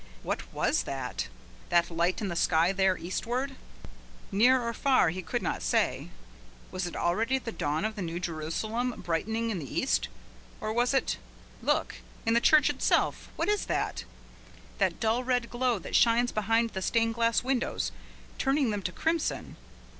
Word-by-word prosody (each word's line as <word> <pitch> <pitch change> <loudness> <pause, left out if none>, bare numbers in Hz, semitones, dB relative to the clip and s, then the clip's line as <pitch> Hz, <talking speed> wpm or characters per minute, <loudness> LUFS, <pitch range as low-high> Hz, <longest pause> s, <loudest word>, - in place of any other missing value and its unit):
What - - -4
was - - +1
that? - - -3 0.4
That 175 0 +3
light 170 +4 0
in 210 - -1
the 170 - -3
sky 165 +1 +3
there, 190 -1 +2
eastward? 250 +9 -3 0.8
near 245 +6 +5
or 235 -1 -2
far 260 - +3
he 185 +3 -4
could 165 - -3
not - - -2
say. - - 0 0.6
Was 185 -1 -2
it 175 - -7
already 225 +10 +1
the 240 -3 -5
dawn 155 -1 -1
of 215 0 -2
the 205 - -5
New 170 -1 -3
Jerusalem 185 +9 -2
brightening 220 +7 -1
in 190 - -2
the 140 -5 -7
east, - - +1 0.5
or 215 - -2
was 245 +3 +2
it 265 - +1 0.4
look - - 0 0.3
in 225 - +3
the 235 - +4
church 305 0 +6
itself, 290 -2 +1
what - - -1
is 415 0 +1
that? - - -1 0.8
that - - +1
dull 230 +2 +1
red 245 -2 0
glow 245 -1 +1
that 180 - -5
shines 240 +1 +4
behind 225 +2 +1
the 190 - -4
stained 230 +3 +1
glass 230 0 +2
windows, 245 - -1 0.5
turning 270 -3 +2
them 205 -1 -2
to 180 - -3
crimson? 325 - -1
225 Hz, 170 wpm, -29 LUFS, 180-245 Hz, 0.8 s, church